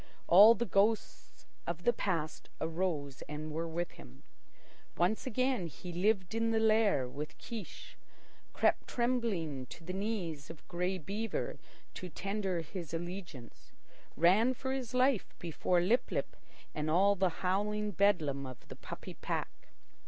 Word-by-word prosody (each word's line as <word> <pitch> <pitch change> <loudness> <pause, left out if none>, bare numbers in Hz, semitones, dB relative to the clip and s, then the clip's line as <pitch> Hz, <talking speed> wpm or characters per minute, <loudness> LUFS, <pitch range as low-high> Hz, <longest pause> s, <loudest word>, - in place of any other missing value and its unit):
All 210 +6 +9
the 235 - -1
ghosts 215 +1 0 0.2
of 170 0 -3
the 240 - +4
past 165 -6 -2
arose 160 -5 -2
and 155 +1 -5
were 165 +2 -2
with 170 +2 -3
him. 65 +1 -14 0.7
Once 185 +8 +1
again 255 -5 +1
he 175 +4 -8
lived 190 +1 +1
in 225 0 +1
the 225 - +2
lair 215 - +3
with 150 +5 -6
Kiche, 220 -6 -8 0.5
crept - - +2
trembling 210 - -1
to 165 - -11
the 185 +3 -5
knees 190 -8 -3
of 165 -2 -11
Grey 180 +2 -1
Beaver 205 +7 -3 0.3
to 185 - -6
tender 195 -1 -2
his 165 0 -6
allegiance, 175 -6 -7 0.4
ran 210 - +5
for 265 +2 -3
his 260 -2 -3
life 255 -3 +2
before 175 +1 +1
Lip 220 +8 +2
lip - - -2 0.4
and 150 0 -2
all 195 +5 +5
the 190 -1 +2 0.2
howling 210 +3 +1
bedlam 160 -9 +2
of 130 -2 -11
the - - -7
puppy - - -8
pack. - - -4
185 Hz, 145 wpm, -33 LUFS, 160-215 Hz, 0.7 s, All